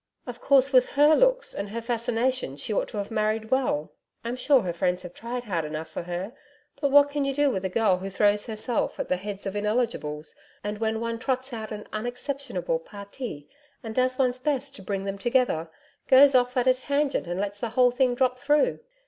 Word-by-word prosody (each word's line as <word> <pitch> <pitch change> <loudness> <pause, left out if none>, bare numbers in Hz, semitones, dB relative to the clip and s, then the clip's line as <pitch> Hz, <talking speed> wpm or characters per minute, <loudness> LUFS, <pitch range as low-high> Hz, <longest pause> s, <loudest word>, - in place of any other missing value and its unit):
Of 245 -1 -8
course, 275 0 +4
with 255 -1 +4
her 295 +2 +6
looks - - +2
and 200 0 -4
her 230 +3 -4
fascination 235 - -1
she 210 - -4
ought - - 0
to - - -8
have 200 +1 -4
married 220 0 -1
well. 250 - 0 0.3
I'm 235 +1 -3
sure 265 +1 +4
her 175 -4 -3
friends 180 +1 0
have 180 -1 -9
tried 240 +2 -5
hard 180 -8 -2
enough 155 +1 -5
for - - -5
her. 180 +5 -5 0.5
But 285 - +2
what 285 +1 +6
can 290 0 -1
you 275 -1 -1
do 290 -1 +3
with 190 -5 -3
a - - 0
girl 190 -2 +2
who 195 +1 -5
throws 205 +2 +2
herself 225 +2 -2
at - - -3
the 185 - +1
heads 200 +1 -6
of 195 0 -4
ineligibles, 205 -9 -2 0.3
and 205 0 -4
when 220 0 0
one 230 0 -3
trots 260 +1 -2
out 220 -1 -6
an 210 -1 -6
unexceptionable 245 - -3
PARTI 200 - -8 0.4
and 225 -1 -5
does 255 +1 +1
one's 255 -1 +1
best 275 0 -1
to - - -11
bring 195 0 -3
them 195 0 -4
together, 240 -9 +1 0.4
goes 275 +1 +7
off 250 0 +2
at 250 - +2
a 255 - +6
tangent 280 -3 -1
and 175 +2 -3
lets 200 0 -3
the 235 - -2
whole 250 +1 +4
thing 250 0 +2
drop 255 0 +1
through. 295 - +2
230 Hz, 215 wpm, -26 LUFS, 200-260 Hz, 0.5 s, goes